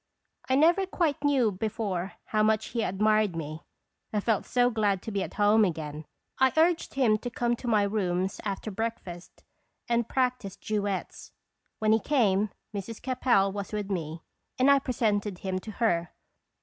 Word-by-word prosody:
I 260 - +3
never 340 +7 +4
quite 325 -6 -1
knew 270 -6 +3
before 200 -2 -3
how 215 - 0
much 215 0 +2
he 235 - -2
admired 215 -1 +2
me. 155 0 -5 0.5
I 210 - 0
felt 210 -1 0
so 245 0 +3
glad 205 -4 0
to 225 - -5
be 200 -1 -1
at - - -5
home 210 +1 +4
again, 155 -4 -3 0.3
I 260 0 +5
urged 330 -1 +2
him 230 -6 +3
to 245 - -5
come 240 0 0
to 245 - -8
my 215 -3 +3
rooms 190 -2 -1
after 205 +1 -4
breakfast 190 -5 -6 0.4
and 235 -1 0
practice 250 -7 -1
duets. 205 -3 -4 0.4
When 215 0 +1
he 220 - +5
came, 215 -7 +2 0.3
Mrs. 210 +3 -5
Capel 245 -6 +2
was 200 0 -5
with 205 -1 -3
me, 160 -3 -4 0.3
and 260 +2 +5
I 280 - +6
presented 210 -6 -1
him 185 0 -3
to 215 - -8
her. 175 -8 +1
215 Hz, 165 wpm, -28 LUFS, 195-240 Hz, 0.5 s, I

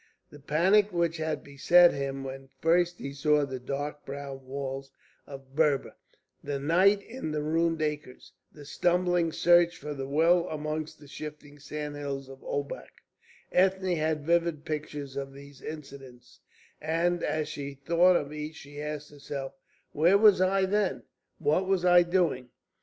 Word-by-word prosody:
The 145 - -12
panic 190 +9 +3
which 170 -1 0
had 155 -2 -3
beset 170 +5 +5
him 135 0 -3
when 135 0 -8
first 175 +2 +2
he 140 - -6
saw 150 +1 +2
the 130 -2 -6
dark 145 +3 -4
brown 140 -2 -7
walls 135 0 -5 0.4
of 135 -1 -11
Berber, 150 -3 +1 0.5
the 145 -1 -2
night 185 +8 +3
in 230 -9 -6
the 150 -1 -2
ruined 165 +1 +1
acres, 150 -4 -5 0.2
the 145 -1 -13
stumbling 175 +2 +1
search 175 +1 +4
for 150 - -6
the 135 -1 -5
well 165 +5 +3
amongst 155 0 -4
the 145 - -14
shifting 150 0 -9
sandhills 145 -2 -5
of 135 0 -11
Obak, 140 0 -5 0.5
Ethne 190 -1 +2
had 155 -2 -1
vivid 170 -2 +1
pictures 150 -3 -5
of 135 -1 -5
these 140 0 -13
incidents, 135 -5 -10 0.4
and 170 +3 0
as 155 -1 -1
she 140 -1 -6
thought 170 +6 +4
of 145 -2 -1
each 150 +1 -6
she 145 0 -10
asked 150 -1 -5
herself: 140 -2 -6 0.4
"Where 170 +6 +4
was 205 -3 +6
I 190 +1 +3
then? 205 0 0 0.3
What 160 +5 +1
was 190 -2 +1
I 175 0 +7
doing?" 170 -8 0
150 Hz, 150 wpm, -28 LUFS, 140-170 Hz, 0.5 s, I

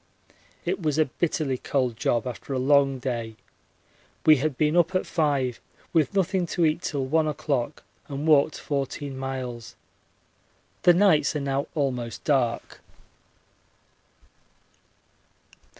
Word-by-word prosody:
It - - -1
was 155 -2 0
a 155 - +4
bitterly 145 -3 -2
cold 130 -4 -1
job 115 +2 0
after 125 +2 -6
a - - 0
long 135 +1 +3
day. 120 -3 -4 0.9
We 155 -1 +7
had 140 0 -2
been 150 +1 +2
up 175 +1 +3
at 185 - +1
5 140 -7 0 0.3
with 165 +3 +2
nothing 190 -1 +1
to 170 -1 +1
eat 155 +2 +1
till 140 -6 -2
1 155 +3 +2
o'clock, 145 -3 -2 0.2
and 140 +1 -4
walked 150 -1 +4
14 140 0 -3
miles. 130 -3 -5 1.1
The 175 - +6
nights 160 -7 +4
are - - 0
now 140 0 -1
almost 125 -6 -2
dark. 125 -5 0
140 Hz, 125 wpm, -25 LUFS, 130-155 Hz, 1.1 s, We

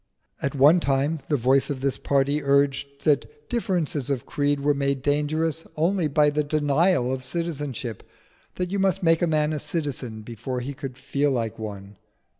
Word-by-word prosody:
At 140 +1 -2
one 145 +6 +6
time 140 +1 0
the 145 - +2
voice 130 +2 +3
of 135 -3 -3
this 135 -1 0
party 140 +2 +1
urged 140 0 +2 0.2
that 445 - 0
differences 175 - -1
of 135 -2 -1
creed 145 -1 0
were 145 +1 +3
made 140 -1 -1
dangerous 155 +2 0
only 170 +2 +1
by 150 0 +3
the 150 +1 0
denial 145 -1 +2
of 130 -1 -4
citizenship 145 -6 -4 0.5
that 180 0 -3
you 200 - 0
must 195 0 +1
make 165 -1 +4
a 175 - +3
man 155 -1 +1
a 150 - -2
citizen 130 -9 -4
before 120 +3 -5
he 135 +3 -5
could 135 -2 -7
feel 140 +2 0
like 115 -5 -2
one. 100 -2 -7
145 Hz, 175 wpm, -25 LUFS, 135-155 Hz, 0.5 s, one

